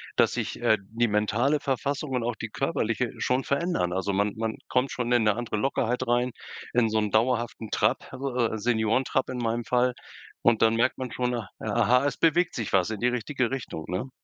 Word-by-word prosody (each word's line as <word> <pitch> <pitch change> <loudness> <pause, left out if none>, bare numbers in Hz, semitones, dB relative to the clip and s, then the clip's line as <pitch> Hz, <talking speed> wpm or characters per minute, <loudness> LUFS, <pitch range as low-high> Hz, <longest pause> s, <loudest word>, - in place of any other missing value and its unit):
dass - - +4
sich, - - -4
äh, 110 - +4
die 115 +1 +1
mentale 115 +8 +2
Verfassung 140 +2 -2
und 125 -3 0
auch 120 -1 -2
die 110 - -5
körperliche 120 -4 -1
schon 130 +1 +1
verändern. 140 - 0
Also, 95 +2 -1
man 100 +1 +1
man 110 0 -2
kommt 125 +1 +1
schon 125 -1 -2
in 120 -2 +4
ne 105 -1 +3
andere 120 -3 -3
Lockerheit 125 0 0
rein, 120 +1 +2 0.4
in 120 -2 +3
so 110 0 +1
'n 105 -1 -1
dauerhaften 115 0 0
Trab, - - 0
also, 135 0 -4
äh, 115 -2 +1
Seniorentrab 115 +4 +1
in 130 - -4
meinem 115 0 -1
Fall 125 0 +2 0.5
und 115 -2 +3
dann 115 0 +4
merkt 115 - +2
man 130 -2 -5
schon: 125 0 -1 0.3
„Aha, 125 +2 +2
es 145 -1 0
bewegt 165 +2 +2
sich 115 -4 -3
was 95 +1 +3
in 105 - -4
die 120 - +3
richtige 125 +1 -1
Richtung“, 115 -11 -5
ne? 95 +9 -3
120 Hz, 200 wpm, -27 LUFS, 110-130 Hz, 0.5 s, dass